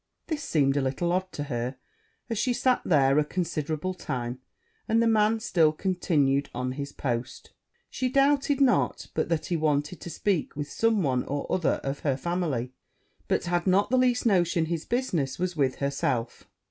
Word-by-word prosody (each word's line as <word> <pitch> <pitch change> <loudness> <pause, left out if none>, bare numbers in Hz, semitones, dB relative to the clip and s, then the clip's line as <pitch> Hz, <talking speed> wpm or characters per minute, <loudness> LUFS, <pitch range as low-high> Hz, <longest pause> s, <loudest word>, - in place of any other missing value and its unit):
This 315 -4 -3
seemed 140 - +1
a - - +2
little 135 +6 -1
odd 185 +1 -1
to 145 - -3
her, 125 -2 -3 0.5
as 230 -3 -2
she 250 +2 +1
sat 255 +1 +2
there 140 -3 +4
a - - +3
considerable 160 +1 -2
time, 125 -7 -4 0.5
and 225 +1 +3
the 230 - +3
man 220 0 +3
still 165 -7 +3
continued 155 -6 +1
on 125 +1 -2
his 140 +2 -5
post: 125 -2 -4 0.4
she 255 - -2
doubted 275 +1 +3
not 265 -2 +2
but - - -1
that 165 -2 0
he 175 - -1
wanted 150 +1 0
to - - -7
speak 195 -1 -1
with 145 0 -5
some 225 -4 +2
one 130 -3 +1
or 145 0 -3
other 180 -3 +1
of 135 +1 -3
her 140 -3 0
family, 150 -7 -2 0.5
but - - +1
had 175 +1 -1
not 195 +4 +3
the 255 - +4
least 250 -1 +2
notion 175 -6 +3
his 165 -1 -3
business 180 - -1
was 180 -1 -2
with 135 -4 +1
herself. 130 -4 -2
165 Hz, 180 wpm, -27 LUFS, 140-200 Hz, 0.5 s, there